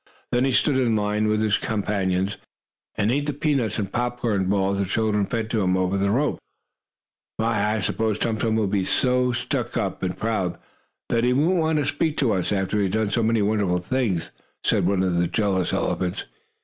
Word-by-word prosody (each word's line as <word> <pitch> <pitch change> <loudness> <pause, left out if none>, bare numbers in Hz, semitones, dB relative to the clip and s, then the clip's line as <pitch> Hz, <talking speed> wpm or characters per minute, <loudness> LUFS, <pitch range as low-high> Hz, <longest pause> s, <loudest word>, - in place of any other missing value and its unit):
Then 120 +2 +2
he 135 - +1
stood 130 +1 +2
in 120 -4 +2
line 105 0 0
with 110 0 +1
his 105 -1 +2
companions, 100 -2 -1 0.6
and 110 +1 +1
ate 145 +3 0
the 145 - -1
peanuts 135 -7 0
and 100 -3 -3
popcorn 120 -5 0
balls 100 0 +1
the 100 - +1
children 105 0 0
fed 115 -2 -2
to 110 - +1
him 95 -1 +2
over 95 +1 0
the 100 0 +1
ropes. 140 +8 +1 1.0
"My, 110 -1 +1
I - - -1
s'pose 110 +2 0
Tum 115 -1 -1
Tum 110 -1 +1
will 110 -1 +2
be 100 -1 0
so 125 +4 +1
stuck 120 - -2
up, - - -2
and 90 -1 -2
proud, 110 -6 -1 0.5
that 115 0 +1
he 125 +1 +3
won't 165 +7 +2
want 160 -1 +1
to 145 - +1
speak 155 +1 -1
to 130 -5 +2
us, 95 0 -1
after 100 +1 0
he 100 - +2
has 95 - -2
done 110 -1 +1
so 115 - +1
many 110 -1 +2
wonderful 100 -4 +1
things," 95 -2 -1 0.3
said - - +2
one 95 -1 +2
of 90 -2 0
the 85 - +2
jealous 95 -3 0
elephants. 90 +1 -1
110 Hz, 205 wpm, -24 LUFS, 95-120 Hz, 1.0 s, he